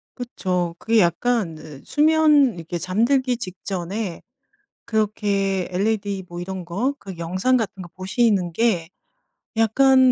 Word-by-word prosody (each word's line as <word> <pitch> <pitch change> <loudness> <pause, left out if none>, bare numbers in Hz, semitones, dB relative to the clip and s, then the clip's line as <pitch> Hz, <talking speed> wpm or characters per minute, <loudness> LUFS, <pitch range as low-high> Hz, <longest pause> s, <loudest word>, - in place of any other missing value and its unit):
그쵸. 180 -8 -2
그게 225 0 +2
약간 185 0 +1
그 150 -3 -11
수면 300 - +4
이렇게 170 +1 -5
잠들기 240 - +1
직전에 185 0 -5 0.6
그렇게 200 -3 0
LED 200 0 -1
뭐 175 0 -7
이런 185 0 -5
거 205 +11 -1
그 190 -2 -9
영상 185 +10 +1
같은 210 -5 -3
거 175 - -10
보시는 190 -1 +1
게 180 -4 +1 0.7
약간 260 +3 +5
200 Hz, 235 characters per minute, -22 LUFS, 180-240 Hz, 0.7 s, 약간